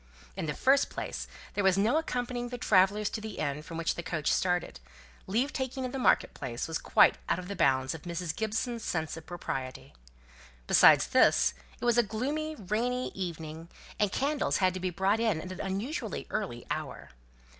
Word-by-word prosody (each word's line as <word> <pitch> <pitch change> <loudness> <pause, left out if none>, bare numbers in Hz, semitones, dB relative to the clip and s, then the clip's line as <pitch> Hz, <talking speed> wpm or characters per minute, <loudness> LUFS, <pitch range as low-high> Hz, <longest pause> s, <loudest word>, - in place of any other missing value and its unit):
In - - -3
the 150 - -2
first 275 +1 +3
place, - - -5 0.3
there 205 - 0
was 190 -1 +4
no 215 +8 +3
accompanying 245 -5 -3
the 245 - -5
travellers 205 -1 +3
to 220 - -4
the 215 -1 -7
inn 145 +1 -2
from 165 +1 -8
which 165 0 0
the - - -5
coach 165 -3 -1
started; 180 - 0 0.5
leave 245 +9 0
taking 260 0 -3
in 250 - -4
the 270 - -4
market - - +3
place 120 -3 -4
was 160 -1 -2
quite - - +4
out - - +2
of 180 -1 -7
the 200 - -4
bounds 135 -5 +2
of 160 - -8
Mrs. 170 -1 -4
Gibson's 220 +2 -2
sense 160 -3 -2
of 160 -1 -11
propriety. 135 -7 -5 0.7
Besides - - +7
this, - - +4 0.3
it - - -4
was 240 0 +4
a - - +8
gloomy, 280 +9 -3
rainy 240 +4 -1
evening, 165 -3 -6 0.3
and 205 -2 +2
candles 285 +5 0
had 185 -2 +2
to 185 - -4
be 185 0 -1
brought 195 +4 +1
in 220 -8 +1
at 185 +3 -7
an 185 - -6
unusually 205 - -3
early 185 - -3
hour. - - -5
195 Hz, 190 wpm, -30 LUFS, 165-240 Hz, 0.7 s, a